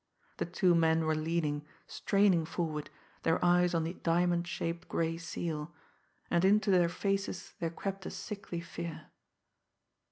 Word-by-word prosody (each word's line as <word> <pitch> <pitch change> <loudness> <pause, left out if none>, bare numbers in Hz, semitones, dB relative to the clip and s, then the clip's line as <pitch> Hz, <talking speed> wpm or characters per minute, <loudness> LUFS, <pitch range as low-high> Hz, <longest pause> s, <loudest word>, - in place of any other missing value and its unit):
The - - -2
two 180 0 +3
men 160 -1 +3
were 155 - +2
leaning, 155 -2 -1 0.2
straining 195 -4 +3
forward, 155 -2 -3 0.3
their 165 - +2
eyes 175 0 +4
on 165 - +2
the 165 +2 -3
diamond 175 0 +1
shaped 170 0 -3
gray 165 0 0
seal 165 -1 -4 0.6
and 170 0 +3
into 205 +2 +4
their 175 -2 +5
faces 195 0 -2
there 165 - 0
crept 195 +2 -5
a - - -3
sickly 200 -5 -5
fear. 170 -1 -7
170 Hz, 140 wpm, -32 LUFS, 165-180 Hz, 0.6 s, their